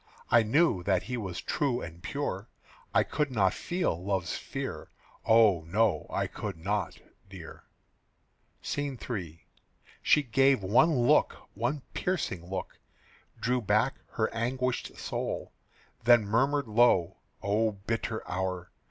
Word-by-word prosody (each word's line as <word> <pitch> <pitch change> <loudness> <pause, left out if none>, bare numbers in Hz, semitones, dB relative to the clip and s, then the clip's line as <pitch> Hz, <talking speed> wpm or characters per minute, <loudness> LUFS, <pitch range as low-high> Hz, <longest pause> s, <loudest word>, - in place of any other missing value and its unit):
I 120 - +7
knew 115 - +3
that 95 0 +1
he 125 - -4
was 95 -7 -4
true 135 -5 0
and 85 -3 -8
pure, 100 0 -4 0.4
I - - +4
could 150 -1 -1
not 95 -6 +2
feel 175 - -2
love's 95 -3 -1
fear. - - -5 0.4
Oh, 110 -6 +5
no; 105 +3 +1
I - - -1
could - - -6
not, 100 +2 -2 0.3
dear." - - -11 1.0
SCENE 145 -2 -3
III. 90 -9 -5 0.6
She 150 - +4
gave 135 -2 +3
one 120 - +4
look, - - +4 0.2
one 145 -2 -2
piercing 150 - -2
look, 95 - -5 0.6
Drew 125 +1 +1
back 110 +5 +1
her 110 - 0
anguished 125 +2 -2
soul, - - -4 0.5
Then 120 -2 +6
murmured 135 +6 +1
low, 105 -6 +3 0.3
"O 105 +2 +1
bitter 110 +2 -4
hour! 90 -1 -3
110 Hz, 125 wpm, -29 LUFS, 95-130 Hz, 1.0 s, I